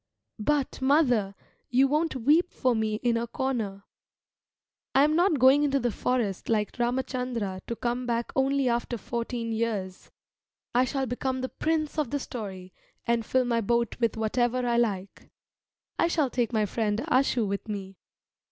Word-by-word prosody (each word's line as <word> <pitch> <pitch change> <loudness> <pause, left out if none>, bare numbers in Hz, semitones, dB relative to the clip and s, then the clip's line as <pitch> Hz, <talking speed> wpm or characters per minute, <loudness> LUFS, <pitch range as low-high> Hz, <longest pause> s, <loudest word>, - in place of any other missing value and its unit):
But, 280 +5 0
mother, 250 -8 +3 0.3
you 260 +2 +4
won't 305 +2 0
weep 300 +8 +3
for 255 -2 +1
me 220 -1 0
in 240 -1 +2
a 235 +1 -2
corner. 225 -6 -3 1.1
I 270 - +6
am 305 +1 +3
not 345 -2 +3
going 265 +3 +6
into 280 -2 +2
the 240 -2 0
forest 220 -4 -1
like 210 -2 +1
Ramachandra 240 -5 -2
to 235 - -3
come 245 +2 -2
back 235 0 -1
only 270 0 +2
after 240 0 -1
fourteen 235 +1 -4
years. 215 -5 -3 0.6
I 250 +2 +4
shall 270 +1 -1
become 260 +1 -2
the 260 - -3
prince 310 -1 -1
of 295 -6 0
the 285 - -1
story, 190 -8 -7 0.3
and 235 -1 +1
fill 255 +3 +1
my 235 -1 +1
boat 235 +1 0
with 230 -2 +1
whatever 240 +3 0
I 235 -1 +1
like. 200 -5 -2 0.7
I 335 - +4
shall 305 -6 +1
take 240 -2 0
my 215 -2 +2
friend 210 +1 -1
Ashu 255 -5 +2
with 200 +3 -3
me. 195 -3 -6
240 Hz, 160 wpm, -27 LUFS, 220-265 Hz, 1.1 s, I